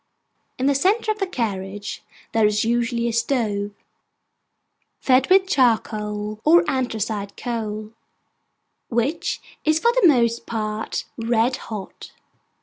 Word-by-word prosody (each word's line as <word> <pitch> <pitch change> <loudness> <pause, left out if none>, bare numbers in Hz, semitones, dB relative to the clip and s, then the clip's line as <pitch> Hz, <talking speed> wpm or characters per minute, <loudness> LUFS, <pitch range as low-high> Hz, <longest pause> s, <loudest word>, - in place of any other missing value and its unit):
In 260 - -1
the 280 - +4
centre 405 - +2
of 430 - -4
the 390 - 0
carriage 205 - -4 0.3
there 225 -2 +4
is 210 +1 +1
usually 235 0 0
a 235 - -1
stove, 220 -4 0 1.3
fed 260 0 +3
with 380 0 +6
charcoal 215 - 0
or 340 +3 +5
anthracite 220 -5 -2
coal; 215 -3 -4 1.0
which 240 +7 -1 0.2
is 310 0 +3
for 470 +9 +3
the - - +5
most 235 -5 +2
part 215 -1 -3
red 230 +2 +1
hot. 210 -4 -8
235 Hz, 120 wpm, -22 LUFS, 215-270 Hz, 1.3 s, with